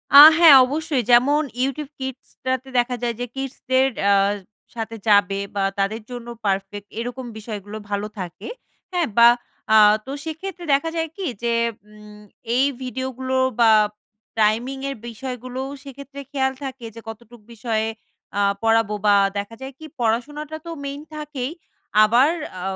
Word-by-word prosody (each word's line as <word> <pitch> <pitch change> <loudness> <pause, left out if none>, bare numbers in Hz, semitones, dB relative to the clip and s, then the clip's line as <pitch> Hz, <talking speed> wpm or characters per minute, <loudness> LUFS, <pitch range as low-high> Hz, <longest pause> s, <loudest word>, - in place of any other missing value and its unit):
আ - - +13 0.2
হ্যাঁ, 330 -4 +9
অবশ্যই 295 -2 -1
যেমন 275 +5 +5 0.2
YouTube 275 +2 -3
Kids 265 -1 -6 0.2
টাতে 260 0 -1
দেখা 245 +1 +2
যায় 235 -1 -1
যে, 245 - -2
kids 270 -1 -4 0.2
দের 260 +1 +5 0.2
আ - - +6 0.6
সাথে 225 0 -5
যাবে 200 -2 +4 0.2
বা 200 - 0 0.2
তাদের 205 +3 -1
জন্য 240 -1 -7 0.2
পারফেক্ট 195 +1 -2
এরকম 245 +2 -5
বিষয়গুলো 210 -1 -7
ভালো 205 +1 -2
থাকে। 180 -2 -7 0.5
হ্যাঁ? 350 -2 +1
বা 235 0 +9 0.5
আ - - +7 0.3
তো 265 - -7
সেক্ষেত্রে 345 +3 -6
দেখা 285 +4 +2
যায় 325 -1 -1
কি 390 - -4 0.2
যে, 235 0 +1 0.4
উম 210 0 -14 0.3
এই 265 +2 +4 0.2
ভিডিওগুলো 260 0 -3 0.2
বা 225 -1 +6 0.7
টাইমিংয়ের 260 +6 0
বিষয়গুলোও 255 +2 -6
সেইক্ষেত্রে 280 0 -10
খেয়াল 265 -1 0
থাকে 265 -3 -6
যে, - - -8
কতটুক 235 +1 -12
বিষয়ে 220 -1 -1 0.5
আ - - +3 0.2
পড়াবো 225 -2 +3
বা 205 -1 +6 0.2
দেখা 205 +3 -4
যায় 265 +1 -7
কি? 315 - -10
পড়াশোনাটা 290 +7 -2
তো 335 - -6
মেইন 280 +1 -5
থাকেই, 295 -3 -4 0.5
আবার 240 +7 +5 0.3
আ - - -7
250 Hz, 150 wpm, -22 LUFS, 220-275 Hz, 0.7 s, আ